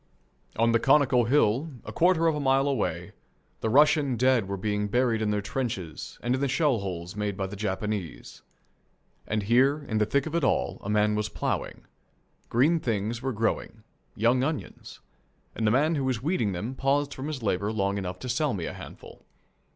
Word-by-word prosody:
On 115 +1 +3
the 115 - +3
conical 135 -2 +4
hill, 130 +3 +2 0.2
a - - -6
quarter 175 -1 +3
of 165 - +4
a 150 - -3
mile 135 0 +2
away, 135 -6 -2 0.5
the 110 - -1
Russian 145 +1 +4
dead 125 -4 +3
were 100 0 -3
being 105 +1 -1
buried 120 0 +1
in 110 - 0
their 105 -1 -1
trenches 100 -8 -4
and 120 +1 +1
in 130 - -1
the 140 - +2
shell 140 -3 +2
holes 90 -2 -5
made 105 -2 -2
by 95 - -1
the 95 +2 -7
Japanese. 100 -2 -4 0.9
And 105 -1 -1
here, 135 +7 +3
in 110 -1 0
the 105 - +2
thick 140 -1 +1
of 160 - -5
it 170 -2 0
all, 130 - 0
a 100 - -5
man 105 0 +2
was 105 0 -1
ploughing. - - -3 0.6
Green 150 +8 +3
things 115 -2 -2
were 135 0 -1
growing 110 -1 -2 0.3
young 120 +4 +2
onions 150 +1 -5 0.5
and 110 - -1
the - - +5
man 145 +8 +3
who 140 -4 -1
was 130 -3 -1
weeding 145 - 0
them 105 +9 -4
paused 140 +1 0
from 135 +2 -6
his 145 -6 -5
labour 100 0 0
long 100 -2 -1
enough 90 -1 -5
to 130 - -5
sell 130 +1 0
me 85 -4 -4
a - - -5
handful. - - -12
115 Hz, 195 wpm, -27 LUFS, 105-135 Hz, 0.9 s, the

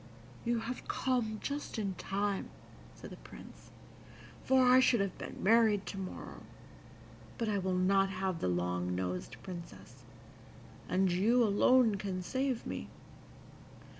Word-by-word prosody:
"You 235 -1 +1
have 240 +3 -6
come 240 -4 0
just 285 -3 -4
in 200 -3 -1
time," 200 +1 -2 0.5
said - - -11
the - - -9
Prince, - - -13 0.7
"for 260 -1 +4
I 250 +1 +7
should 255 -2 +4
have 195 -2 -1
been - - -7
married 215 -1 +4
to 195 - -6
morrow; 185 -1 -7 1.0
but 230 - -1
I 205 -2 +1
will 185 -1 -1
not 195 +1 +3
have 190 -2 -2
the - - -1
long 90 0 -1
nosed 90 0 -3
Princess, 130 - -10 0.9
and 185 0 +2
you 225 +8 +3
alone 225 +1 +4
can 190 -2 -4
save 260 +3 -1
me. - - -5
195 Hz, 135 wpm, -33 LUFS, 185-235 Hz, 1.0 s, I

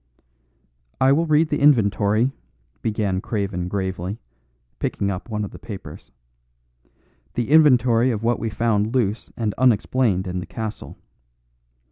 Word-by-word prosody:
"I 130 +1 +4
will 165 +4 +2
read 155 +1 +3
the 150 - 0
inventory," 110 -3 +3 0.5
began 105 -4 -1
Craven 100 -5 -3
gravely, 95 0 -3 0.6
picking 100 0 -1
up 95 +5 -6
one 105 -1 -2
of - - -9
the - - -11
papers, 100 -4 -9 1.3
"the 120 +3 -2
inventory 130 -6 +5
of 110 -3 -2
what 120 0 +1
we 115 - -2
found 110 +1 0
loose 110 -3 -1
and 110 -3 -1
unexplained 120 -4 +2
in 90 0 -3
the 90 - -7
castle. 110 -2 -6
110 Hz, 130 wpm, -22 LUFS, 100-125 Hz, 1.3 s, inventory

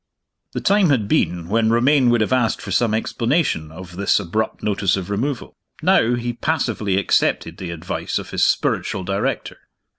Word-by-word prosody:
The - - -3
time 200 -3 +3
had 120 -8 +2
been 85 -3 0
when 110 +3 +2
Romayne 125 +3 +4
would 120 -1 +3
have 110 - +1
asked 125 -3 +1
for 100 - -7
some 110 +3 +2
explanation 115 - 0
of 90 +1 -11
this 100 +1 +2
abrupt 105 +4 -3
notice 100 -2 +1
of 95 +1 -5
removal. 125 +5 -3 0.3
Now, 120 +2 +4
he 120 0 -3
passively 120 -8 -1
accepted 100 - +1
the 90 - -6
advice 85 +2 -4
of - - -6
his - - 0
spiritual 95 - 0
director. 95 +2 -2
110 Hz, 170 wpm, -21 LUFS, 95-120 Hz, 0.3 s, Romayne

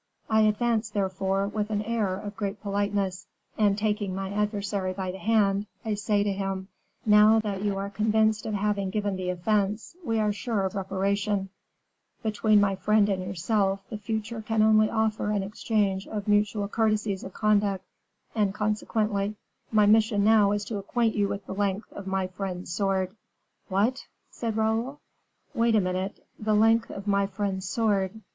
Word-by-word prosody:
I 220 0 +5
advance, 220 +1 +2
therefore, 195 -1 -1
with 210 0 -2
an 210 -1 -1
air 215 -4 0
of 205 +1 -7
great 200 0 -3
politeness, 200 -2 -1 0.3
and 205 -2 +2
taking 210 -3 -1
my 195 0 -4
adversary 205 -2 -1
by 185 -1 -3
the 190 - -9
hand, 205 0 +2 0.2
I 220 - 0
say 205 0 +1
to 205 -1 0
him: 195 0 -3 0.4
'Now 210 +1 +6
that 200 -3 -3
you 200 -1 -1
are 200 +1 -4
convinced 215 +1 +1
of 215 - -2
having 205 -1 0
given 205 0 -1
the 185 -1 -3
offense, 205 - -1
we 225 -6 0
are 210 -1 +1
sure 205 -2 -1
of 190 - -2
reparation; 195 +1 -1 0.7
between 215 -1 +3
my 200 -1 +2
friend 210 +1 +3
and 190 -2 0
yourself, 195 +2 -1
the 215 - -3
future 220 +1 -3
can 220 0 +1
only 215 0 +5
offer 220 -2 0
an 205 -2 0
exchange 200 -1 -1
of 210 -2 -5
mutual 205 0 +2
courtesies 215 -2 0
of 190 - -8
conduct, 205 -2 +1 0.5
and 210 -3 +1
consequently, 210 -1 -1 0.4
my 215 -2 +5
mission 215 0 +4
now 210 -1 +5
is 205 0 -1
to 210 -1 -3
acquaint 225 +3 0
you 205 -1 +1
with 200 0 -5
the - - -5
length 200 +1 -2
of 200 - -8
my 190 0 0
friend's 185 -1 -5
sword.'" 190 0 0 0.5
"What!" 215 +8 0 0.2
said 225 -2 -3
Raoul. 225 +6 0 0.5
"Wait 230 -3 +2
a - - +5
minute. 185 +1 -3
'The 215 0 +1
length 225 +2 +4
of 195 - -7
my 200 -1 +2
friend's 195 -1 -3
sword. 210 -2 0
205 Hz, 170 wpm, -27 LUFS, 195-215 Hz, 0.7 s, Now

